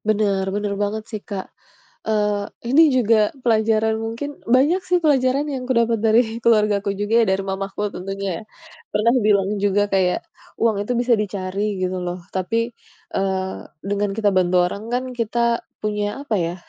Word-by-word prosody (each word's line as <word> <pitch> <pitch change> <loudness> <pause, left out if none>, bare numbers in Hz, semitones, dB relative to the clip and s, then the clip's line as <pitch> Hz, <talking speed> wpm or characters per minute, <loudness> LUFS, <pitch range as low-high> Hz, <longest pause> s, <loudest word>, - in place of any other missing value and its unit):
Benar 200 -3 +1
benar 205 +1 -2
banget 210 +1 -1
sih 215 -2 -4
Kak. 200 -3 -5 0.6
Eee, 210 -2 0 0.2
ini 310 - +7
juga 220 -3 +4 0.2
pelajaran 220 -1 +2
mungkin, 230 +6 -4 0.3
banyak 305 +9 +3
sih 360 - +4
pelajaran 275 -1 +3
yang 260 -2 -3
aku - - +3
dapat 230 -1 +2
dari 220 +2 +6 0.2
keluargaku 210 -3 +3
juga 205 +2 -2
ya, - - +2
dari 190 0 0
mamahku 195 +1 -4
tentunya 195 +1 -4
ya. - - -12 0.5
Pernah 230 +3 +3
bilang 200 -2 +3
juga 205 0 +2
kayak, 185 -2 +2 0.4
"uang 225 -3 +3
itu 245 - -2
bisa 245 0 +3
dicari 200 0 -3
gitu 185 0 -1
loh, 175 0 -3 0.2
tapi, 230 +5 -1 0.4
eee, 190 -1 -1 0.3
dengan 205 +1 0
kita 210 -2 +3
bantu 180 -1 +3
orang 200 +3 -4
kan 250 +1 +1 0.2
kita 235 +1 +1 0.2
punya 210 +4 -2
apa 225 - 0
ya, 170 +1 -2
210 Hz, 160 wpm, -21 LUFS, 195-230 Hz, 0.6 s, ini